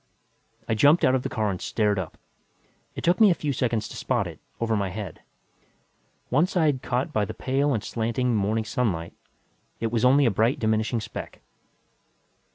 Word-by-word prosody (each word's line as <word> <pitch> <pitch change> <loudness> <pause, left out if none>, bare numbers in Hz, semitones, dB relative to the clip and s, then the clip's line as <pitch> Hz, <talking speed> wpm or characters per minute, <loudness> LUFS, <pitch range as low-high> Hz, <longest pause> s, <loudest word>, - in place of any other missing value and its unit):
I - - +1
jumped 145 +10 +5
out 130 - +4
of 130 - +2
the - - -4
car 110 -2 -1
and 90 - -5
stared 105 -3 0
up. 90 -4 -6 0.8
It - - -6
took 175 +6 +2
me 215 - +8
a 175 - +3
few 145 -3 -2
seconds 115 -4 -1
to - - -10
spot - - 0
it, - - -8 0.2
over 115 -1 0
my 100 -2 -1
head. 100 +2 -7 1.1
One 150 +8 +3
side 155 -8 +1
caught 125 +1 -2
by 105 - +2
the 100 - -5
pale 140 +2 0
and 110 -6 -1
slanting 120 +2 -1
morning 110 +2 0
sunlight, 105 -8 -2 0.7
it 115 -1 -2
was 115 -2 0
only 135 +3 +5
a 115 - +3
bright 110 +6 +2
diminishing 110 +1 0
speck. - - -8
115 Hz, 180 wpm, -25 LUFS, 110-130 Hz, 1.1 s, me